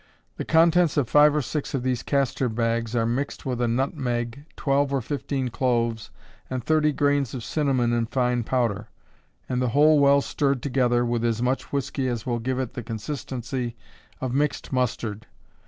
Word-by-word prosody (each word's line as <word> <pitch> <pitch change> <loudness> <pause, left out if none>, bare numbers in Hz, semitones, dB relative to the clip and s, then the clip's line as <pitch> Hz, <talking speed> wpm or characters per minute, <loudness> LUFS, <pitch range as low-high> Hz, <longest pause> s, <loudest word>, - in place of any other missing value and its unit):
The - - -4
contents 165 -1 +4
of 140 -5 +2
five 150 +3 +5
or 150 - +1
six 145 +1 -3
of 130 - -2
these 130 -2 0
castor 135 -2 0
bags 115 0 -1
are 115 -1 +2
mixed 125 +5 -2
with 125 -2 -2
a 120 - +2
nutmeg, 125 0 -2
twelve 140 -1 +1
or 140 - +1
fifteen 135 0 -3
cloves 115 -2 0 0.4
and 130 -2 -3
thirty 155 +2 +3
grains 145 -3 +1
of 120 - -5
cinnamon 130 -6 +1
in 115 -1 0
fine 125 -1 0
powder, 115 -4 -1 0.6
and 125 -1 -1
the 125 - +1
whole 150 0 +6
well 140 0 +5
stirred 140 -2 -1
together 125 -3 +2
with 120 -1 -1
as 115 0 0
much 130 +2 -1
whiskey 140 -1 -1
as 120 -3 -3
will 120 -2 -1
give 130 +2 -2
it 130 -3 -3
the - - -5
consistency 120 +1 -4 0.4
of 130 -2 -3
mixed 145 0 -1
mustard. 110 -4 -2
125 Hz, 175 wpm, -25 LUFS, 120-140 Hz, 0.6 s, whole